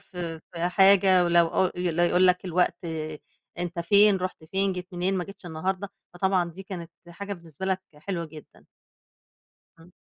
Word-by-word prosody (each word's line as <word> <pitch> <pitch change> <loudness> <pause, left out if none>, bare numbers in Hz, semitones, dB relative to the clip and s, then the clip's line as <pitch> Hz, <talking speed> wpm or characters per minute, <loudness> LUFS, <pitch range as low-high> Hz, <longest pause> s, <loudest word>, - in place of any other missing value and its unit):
في 170 -3 -7
في 170 0 -1
حاجة 190 -1 +5
ولو 170 -1 +4
أو 185 +2 +1
لا 175 -1 +1
يقول 180 +2 +4
لك: 180 +1 +2
"الوقت، 180 0 0 0.7
أنت 175 -1 -4
فين؟ 200 +3 +5
رُحت 185 -3 -5
فين؟ 195 +3 0
جيت 180 0 -6
منين؟ 180 +2 0
ما 180 - -1
جيتش 195 -2 -12
النهارده."، 185 +5 -3 0.3
فطبعًا 180 -1 +1
دي 190 +4 -10
كانت 175 -3 -7 0.2
حاجة 200 +4 -6
بالنسبة 170 -1 -8
لك 190 -1 0 0.2
حلوة 170 +2 -4
جدًا. 155 -1 -14 1.2
إمم. 165 +2 -17
180 Hz, 160 wpm, -26 LUFS, 170-190 Hz, 1.2 s, حاجة